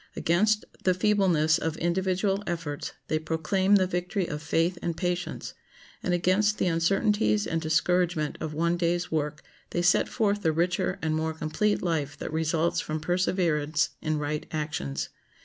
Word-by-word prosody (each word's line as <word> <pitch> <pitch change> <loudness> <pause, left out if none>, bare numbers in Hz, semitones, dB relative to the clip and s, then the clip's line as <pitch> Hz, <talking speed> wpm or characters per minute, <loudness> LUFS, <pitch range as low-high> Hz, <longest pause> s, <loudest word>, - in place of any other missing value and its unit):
Against 210 +6 +2 0.2
the 185 -1 +3
feebleness 180 -6 +3
of 165 -1 -2
individual 190 +3 0
efforts 165 -4 -4
they 155 - 0
proclaim 175 +5 +1
the 190 -2 +4
victory 180 +1 -1
of 150 -2 -5
faith 165 +3 0
and 170 -1 -2
patience, 180 -1 -3 0.5
and 180 - -1
against 185 +4 +2
the - - +1
uncertainties 200 +5 +2
and 165 0 -1
discouragement 165 0 +1
of 155 - -3
one 170 +3 0
day's 175 0 0
work 150 -1 -2 0.3
they 175 - -1
set 180 +2 +3
forth 205 -3 0
the 160 - +2
richer 180 +3 0
and 160 -1 +1
more 160 0 -1
complete 185 +7 0
life 150 -5 -1
that 155 - -6
results 160 +1 +1
from 155 +1 -3
perseverance 165 -3 +1
in 155 -1 0
right 150 0 -3
actions. 70 - -3
170 Hz, 155 wpm, -27 LUFS, 155-185 Hz, 0.5 s, the